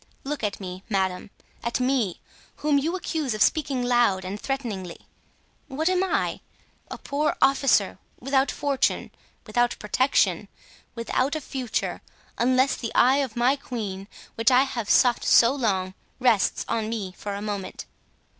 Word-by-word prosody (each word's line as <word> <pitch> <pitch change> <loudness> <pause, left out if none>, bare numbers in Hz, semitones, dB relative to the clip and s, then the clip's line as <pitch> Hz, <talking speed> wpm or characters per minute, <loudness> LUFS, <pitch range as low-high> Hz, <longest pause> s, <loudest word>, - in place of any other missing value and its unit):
Look 285 -2 -4
at 205 -2 -2
me, 185 -1 -7
madame—at 195 +5 -3
me, 250 -8 0 0.4
whom 295 -1 +2
you 325 +6 -1
accuse 310 -9 -2
of 210 - +4
speaking 275 -3 +1
loud 240 -6 +2
and 200 +3 -5
threateningly. 220 -10 -4 0.6
What 305 +5 -1
am 370 0 +2
I? 380 - -1 0.5
A - - -6
poor 295 +2 -1
officer, 275 0 +3 0.2
without 275 0 +1
fortune, 280 -2 0 0.3
without 240 +2 +1
protection, 255 +6 +1 0.5
without 255 +5 -1
a - - -1
future, 260 -4 -3 0.4
unless 255 +3 +3
the 230 - -5
eye 260 +3 +5
of 270 -5 -2
my 245 +3 +3
queen, 205 -8 -6 0.3
which 225 +2 +2
I 255 +1 +5
have 235 -6 -4
sought 245 -2 +4
so 235 +2 +5
long, 195 -8 -1 0.3
rests 240 -6 +2
on 220 -1 -1
me 205 -5 -4
for 205 -1 -5
a - - -4
moment. 205 -3 -5
245 Hz, 145 wpm, -25 LUFS, 210-275 Hz, 0.6 s, eye